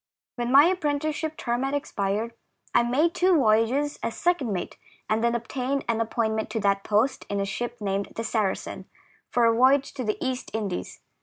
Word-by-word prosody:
When 240 0 -2
my 280 +3 +8
apprenticeship 310 -2 -1
term 240 +1 -1
had 270 +1 -1
ex 285 - -4
pired, 205 +4 -1 0.4
I - - +5
made 280 +8 +2
two 365 0 +3
voyages 255 +3 +2
as 230 - -3
second 345 -10 +1
mate, 185 -3 -4 0.3
and 220 +1 0
then 235 0 +2
obtained 255 +3 -2
an 230 -1 +1
appointment 220 -1 -1
to 225 - -2
that 200 -1 +1
post 220 +6 +1
in 200 - -1
a 200 - 0
ship 240 +5 -4
named 200 -1 -2
the 225 - -3
Saracen, 215 -4 -2 0.4
for 240 -1 +3
a 230 - +5
voyage 265 +3 +4
to 260 - -4
the 215 -2 -1
East 260 -1 -3
Indies. 205 -5 -4
240 Hz, 185 wpm, -26 LUFS, 220-275 Hz, 0.4 s, my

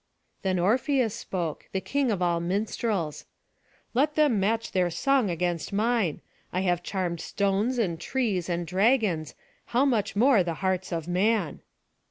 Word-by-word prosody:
Then 190 -2 0
Orpheus 240 +5 +2
spoke, 175 -8 -4
the 190 - +1
king 275 +5 0
of 195 -5 0
all 170 -1 +2
minstrels: 190 -2 -2 0.7
"Let 290 +5 +2
them 290 -9 +3
match 225 +4 0
their 180 -2 +2
song 250 +6 +2
against 175 0 -2
mine. 215 -5 +1 0.3
I 185 - -1
have 175 -2 +1
charmed 175 -3 -3
stones, 200 +7 0
and 175 -8 0
trees, 210 -10 -1
and 175 0 -1
dragons, 190 - +1 0.3
how 250 +4 +2
much 230 -8 0
more 235 0 +5
the 170 -2 -2
hearts 190 0 0
of 165 -1 -3
man!" 185 -2 +1
195 Hz, 150 wpm, -27 LUFS, 175-230 Hz, 0.7 s, more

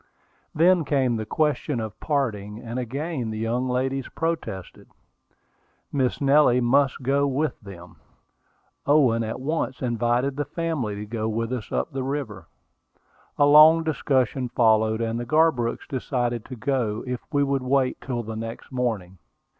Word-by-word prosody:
Then 175 +2 +4
came 135 -5 +1
the 110 -1 -4
question 150 -1 0
of 110 -2 -6
parting, 110 -9 -2
and 120 +1 -5
again 135 +1 -3
the 110 - -4
young 120 +3 -1
ladies 130 +1 -1
protested. 160 - -4 1.1
Miss 130 -3 0
Nellie 140 -3 +4
must 135 +2 +2
go 140 +2 +2
with 140 0 -1
them. 90 -4 -12 0.9
Owen 130 -6 +4
at 110 +2 -4
once 140 -1 -2
invited 120 +2 0
the 145 - -1
family 145 -8 -3
to 105 +1 -6
go 110 0 -3
with 115 +2 -2
us 120 -4 -5
up - - -1
the 135 -1 -3
river. 130 - -4 0.9
A 145 - +5
long 155 +3 +7
discussion 130 -5 0
followed; 110 -1 +3
and 115 0 -1
the - - -3
Garbrooks 155 -5 +1
decided 120 -4 -2
to 130 - -8
go 115 -3 -1
if 125 -1 -3
we 145 -2 +2
would 140 -1 0
wait 130 0 0
till 120 -3 -3
the 110 0 -6
next 115 +3 -7
morning. 110 -8 -3
125 Hz, 150 wpm, -24 LUFS, 115-140 Hz, 1.1 s, long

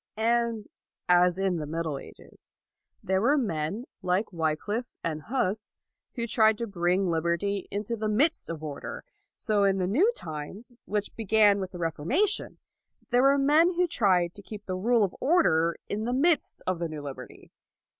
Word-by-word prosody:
And, 230 -1 +1 0.4
as 180 0 +4
in 190 -2 0
the 150 -2 -4
Middle 160 -2 -3
Ages, - - -15 0.5
there 190 0 +1
were 280 +7 +3
men, 200 - -2 0.2
like 185 +3 0
Wycliffe 170 +9 -1 0.2
and 155 -2 -2
Hus, 215 - -2 0.4
who 235 -3 -1
tried 220 -2 +3
to 235 - -3
bring 185 -1 0
liberty 170 +4 -1
into 210 +3 -3
the 215 -1 -3
midst 285 +10 +2
of 160 -2 -5
order, 145 -2 -6 0.3
so 210 -2 +1
in 195 -1 +3
the 185 - 0
new 305 - +3
times, 165 - -7
which 205 0 -3
began 210 -2 +4
with 190 -1 -4
the 185 - -9
Reformation, 175 - 0 0.5
there 245 +1 +4
were 275 +1 +5
men 310 +6 +4
who 360 +1 +3
tried 185 - +2
to 205 - -11
keep 210 +1 -10
the 185 - -3
rule 225 +4 +2
of 190 - -1
order 170 - +3
in 215 +2 -3
the 245 - -1
midst 305 +3 +1
of 185 -2 -1
the 170 -1 -2
new 155 -2 -7
liberty. 140 -2 -9
200 Hz, 170 wpm, -27 LUFS, 175-235 Hz, 0.5 s, were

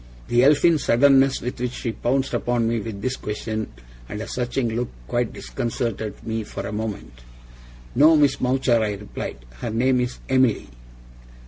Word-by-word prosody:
The 120 +1 +4
Elfin 150 +3 +5
suddenness 135 +1 +4
with 125 0 -5
which 125 0 -1
she 115 - -3
pounced 130 +4 -1
upon 120 -2 +1
me 115 0 0
with 105 -2 -6
this 130 0 0
question, 110 +1 -4 0.4
and 105 - -5
a 110 - -5
searching 125 0 -1
look, 120 +1 -1 0.2
quite - - 0
disconcerted 110 - -4
me 110 0 -2
for 100 - -6
a 100 - -4
moment. 105 - -5 0.7
'No, 155 +5 +6
Miss 145 -3 +3
Mowcher,' 125 -2 +2
I 105 -1 0
replied. 100 -10 -6 0.2
'Her - - -3
name 125 +3 +2
is 125 0 -3
Emily. 130 - +2
120 Hz, 160 wpm, -23 LUFS, 110-130 Hz, 0.7 s, No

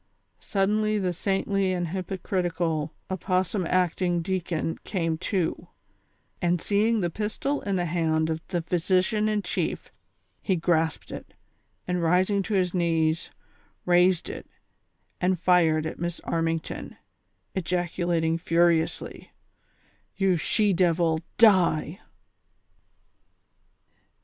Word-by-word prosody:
Suddenly 215 +2 +1
the 185 -3 0
saintly 195 +1 0
and 175 -2 -2
hypocritical, 175 -4 -2 0.2
opossum 185 0 0
acting 175 -1 +1
deacon 175 -3 -2
came 165 -5 -1
to, 185 -2 -2 0.7
and 175 0 +2
seeing 215 +4 +1
the 175 -2 -1
pistol 220 - -2
in 200 -1 -2
the 175 -1 0
hand 160 -1 0
of 160 0 -3
the 175 -3 -2
physician 185 +5 +1
in 210 -1 0
chief, - - -3 0.5
he 190 - +1
grasped 165 -2 0
it, - - -9 0.5
and, 180 -1 0
rising 185 +4 +2
to 205 +2 -2
his 180 -2 +1
knees, 165 -2 +1 0.6
raised 180 0 +3
it - - -7 0.7
and 180 -1 +1
fired 165 -4 +3
at 160 - -5
Miss 175 0 -3
Armington, 165 -1 -3 0.6
ejaculating 175 -2 0
furiously: 165 -1 0 0.4
" - - -39
You 195 -2 +3
she 205 +5 +1
devil, 170 -2 +2 0.2
die 185 -6 +4
180 Hz, 110 wpm, -26 LUFS, 165-190 Hz, 0.7 s, die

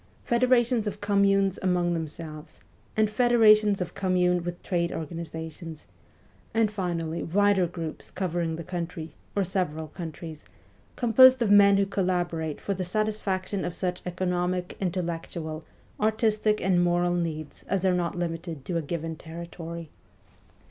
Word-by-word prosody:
federations 240 -2 +3
of 205 - -4
com 200 -1 +2
munes 195 -1 +2
among 180 -2 +1
themselves, 155 -1 -6 0.4
and 215 0 +4
federations 215 -3 +5
of 180 - -3
communes 180 -2 +1
with 175 0 -6
trade 170 -2 0
organizations; 160 0 -6 0.7
and 225 -2 +3
finally, 170 -5 -2
wider 200 0 +3
groups 165 -2 -6
covering 175 -3 -2
the 170 - -6
country, 170 -3 -5 0.2
or 200 - +2
several 165 -4 -2
countries, 160 -2 -8 0.5
composed 260 +2 +7
of 230 -4 +2
men 200 -1 +7
who 200 - +3
collaborate 175 -5 -1
for 200 - -2
the 185 -1 -3
satisfaction 200 -1 -1
of 175 - -3
such 180 -1 -2
\ - - -31
economic, 180 0 -1
intellectual, 165 -3 -3 0.4
artistic, 215 0 +2
and 180 -2 +2
moral 175 0 +2
needs 160 -3 -3
as 195 -1 0
are 185 - +4
not 175 -1 -1
limited 165 -4 -4
to 175 - -1
a - - 0
given 165 +1 -4
territory. 170 0 -8
180 Hz, 140 wpm, -27 LUFS, 165-200 Hz, 0.7 s, composed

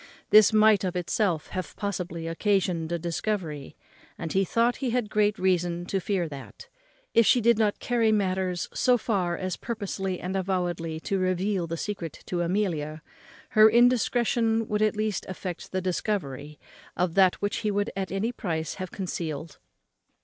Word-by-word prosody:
This 215 0 +8
might 215 -2 +5
of 185 -1 -2
itself 175 -2 0
have 185 -1 -5
possibly 180 -5 -4
occasioned 175 -1 0
a 170 - 0
discovery; 170 -3 -3 0.4
and 165 -2 -5
he 195 - +3
thought 230 +5 +1
he 265 -2 -2
had 235 -3 -1
great 210 0 +2
reason 175 -2 0
to 195 +1 -1
fear 185 -2 -1
that, 140 -3 -10 0.5
if 230 - +6
she 250 - +5
did 235 -1 +3
not 210 -2 +2
carry 235 -3 +1
matters 185 -3 0
so 250 -1 +3
far 185 -7 -1
as 185 -1 -3
purposely 195 -5 -3
and 185 +2 -4
avowedly 175 -4 -2
to 195 +2 -1
reveal 185 0 0
the 165 +1 -4
secret 175 -4 -5
to 175 -1 -2
Amelia, 165 -5 -1 0.5
her 215 0 +7
indiscretion 235 -1 +3
would 210 0 -1
at 215 0 +2
least 210 -3 -1
effect 185 -2 -6
the 185 - -1
discovery 150 -6 -3 0.4
of 180 -1 +1
that 190 -1 +5
which 205 +1 -1
he 215 - -1
would 205 0 0
at 195 -1 -3
any 200 +5 -1
price 160 -9 -3
have 185 - -4
concealed. 160 -5 -5
190 Hz, 165 wpm, -27 LUFS, 175-215 Hz, 0.5 s, This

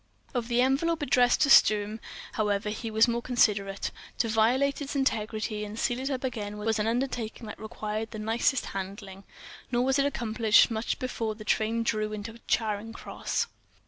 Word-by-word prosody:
Of 240 -3 -2
the 240 0 +2
envelope 295 +5 +1
addressed 250 -2 +3
to 280 - +4
Sturm, 215 -1 +5 0.3
however, 210 -1 0
he 225 +1 -4
was 220 +2 +4
more 235 0 0
considerate; 210 -5 +1 0.3
to 230 - +1
violate 250 +7 +2
its 285 0 -4
integrity 215 -4 -1
and 210 +1 -7
seal 245 +1 0
it 265 +2 -2
up 265 -2 -3
again 210 -5 -4
was 220 +1 0
an 210 - 0
undertaking 235 -1 -2
that 210 - -8
required 220 0 -4
the 225 - -8
nicest 225 +5 +1
handling. 195 0 -6 0.5
Nor 245 0 +2
was 265 +1 +2
it 275 - +3
accomplished 230 -3 +3
much 220 +1 -1
before 230 -4 -3
the 215 0 -10
train 225 +2 +1
drew 215 -1 -1
into 220 +2 -7
Charing 220 0 -1
Cross. - - -3
225 Hz, 175 wpm, -28 LUFS, 215-245 Hz, 0.5 s, Sturm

